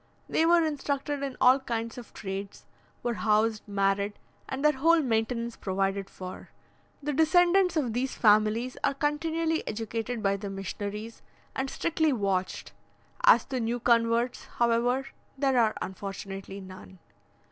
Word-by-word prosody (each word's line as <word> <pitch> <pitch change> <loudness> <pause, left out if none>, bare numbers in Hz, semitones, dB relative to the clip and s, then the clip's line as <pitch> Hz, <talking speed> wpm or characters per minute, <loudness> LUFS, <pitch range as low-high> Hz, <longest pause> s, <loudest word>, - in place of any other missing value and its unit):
They 325 - +2
were 340 -1 +5
instructed 290 -1 -2
in 275 -2 -4
all 255 +2 +6
kinds 230 -3 -3
of 245 -4 -10
trades, 195 0 -6 0.4
were 240 -1 0
housed, 215 0 +1
married, 200 0 +1 0.4
and 270 +3 -3
their 300 - +7
whole 335 +3 +5
maintenance 230 -1 -1
provided 195 0 -1
for. 185 0 -9 0.5
The 295 +1 -1
descendants 355 +4 +4
of 250 -7 0
these 255 +3 -1
families 215 +3 +3
are 280 -1 +1
continually 320 +3 0
educated 225 +1 -3
by 200 0 +2
the 200 0 -6
missionaries, 205 +3 -6 0.3
and 265 0 -2
strictly 315 0 +1
watched: 195 -6 -1 0.5
as - - +7
to 260 - -3
new 235 +1 -1
converts, 235 +1 +2
however, 240 +3 +2 0.3
there 270 -2 +2
are 220 -2 +3
unfortunately 195 0 -7
none. 185 0 -12
235 Hz, 135 wpm, -28 LUFS, 205-275 Hz, 0.5 s, their